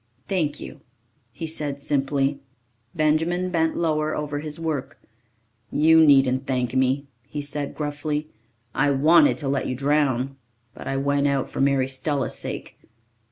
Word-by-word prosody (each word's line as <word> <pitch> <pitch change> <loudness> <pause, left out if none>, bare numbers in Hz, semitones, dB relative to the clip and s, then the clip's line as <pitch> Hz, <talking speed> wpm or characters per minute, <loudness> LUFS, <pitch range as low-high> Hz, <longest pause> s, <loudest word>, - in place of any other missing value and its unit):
"Thank 155 -6 -1
you," 65 - -9 0.5
he 165 - -6
said 150 -3 -1
simply. 140 0 0 0.6
Benjamin 165 +4 +1
bent 160 -2 +1
lower 155 -2 0
over 145 -1 -3
his 150 +1 -2
work. 155 -5 -3 0.7
"You 160 +2 +5
needn't 135 -3 +4
thank 125 -2 -1
me," 130 +2 +1 0.2
he 150 - -5
said 145 0 -2
gruffly. 150 0 -3 0.5
"I 145 +2 +2
wanted 155 - +5
to 145 - -2
let 135 0 0
you 130 - -2
drown. 135 -1 0 0.4
But - - -10
I 135 - -1
went 140 +1 +1
out 140 -2 -1
for - - -3
Mary 135 -1 +2
Stella's 135 -1 -2
sake. - - -6
145 Hz, 145 wpm, -24 LUFS, 135-155 Hz, 0.7 s, You